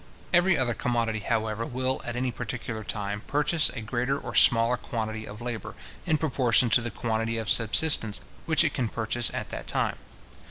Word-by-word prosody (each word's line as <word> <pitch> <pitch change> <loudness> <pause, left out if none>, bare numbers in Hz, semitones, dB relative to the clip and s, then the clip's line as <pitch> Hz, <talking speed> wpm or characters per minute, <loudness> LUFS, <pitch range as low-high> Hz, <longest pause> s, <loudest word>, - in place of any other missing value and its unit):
Every 175 0 +4
other 125 -3 0
commodity, 115 -2 -1
however, 110 +1 -1
will, 130 +2 -2
at 120 - -5
any 125 +1 -1
particular 115 -2 -5
time, 105 -1 -4
purchase 150 +2 +1
a 125 -3 -6
greater 125 +5 -1
or - - -7
smaller 115 +1 +6
quantity 110 -2 -5
of 105 +2 -9
labour, 120 -3 -5 0.3
in 155 - +3
proportion 125 -6 +2
to 120 - +5
the 120 - -3
quantity 115 +1 -2
of 110 -2 -1
subsistence 115 -1 +3 0.3
which 160 0 +4
it 155 - 0
can 120 -4 -1
purchase 115 +1 0
at - - -5
that - - -7
time. - - -1
120 Hz, 175 wpm, -27 LUFS, 110-130 Hz, 0.3 s, smaller